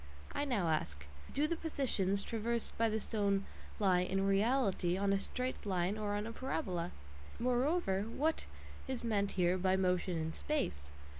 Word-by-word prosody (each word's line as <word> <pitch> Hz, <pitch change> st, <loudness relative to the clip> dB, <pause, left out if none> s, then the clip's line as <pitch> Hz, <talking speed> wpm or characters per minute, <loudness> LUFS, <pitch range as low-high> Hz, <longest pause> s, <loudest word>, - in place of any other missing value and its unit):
I 290 Hz, -, 0 dB
now 220 Hz, -11 st, +1 dB
ask: 75 Hz, -, -1 dB, 0.3 s
Do 290 Hz, +2 st, +2 dB
the 335 Hz, -, 0 dB
"positions" 215 Hz, -, +1 dB
traversed 230 Hz, 0 st, -2 dB
by 230 Hz, 0 st, +2 dB
the 220 Hz, 0 st, 0 dB
stone 200 Hz, -2 st, +1 dB, 0.3 s
lie 190 Hz, -4 st, +4 dB
"in 190 Hz, +2 st, +1 dB
reality" 195 Hz, -3 st, +2 dB
on 200 Hz, 0 st, +2 dB
a 195 Hz, -, +2 dB
straight 255 Hz, +5 st, -3 dB
line 185 Hz, -1 st, 0 dB
or 210 Hz, -1 st, -1 dB
on 205 Hz, +1 st, -1 dB
a 230 Hz, -, -4 dB
parabola? 205 Hz, -, -2 dB, 0.5 s
Moreover, 250 Hz, -, +1 dB
what 310 Hz, +7 st, 0 dB, 0.4 s
is 260 Hz, -2 st, -3 dB
meant 205 Hz, -4 st, +1 dB
here 180 Hz, 0 st, +2 dB
by 185 Hz, +1 st, +3 dB
motion 180 Hz, -1 st, +1 dB
"in 160 Hz, 0 st, -2 dB
space" 75 Hz, -, -2 dB
200 Hz, 160 wpm, -35 LUFS, 185-245 Hz, 0.5 s, lie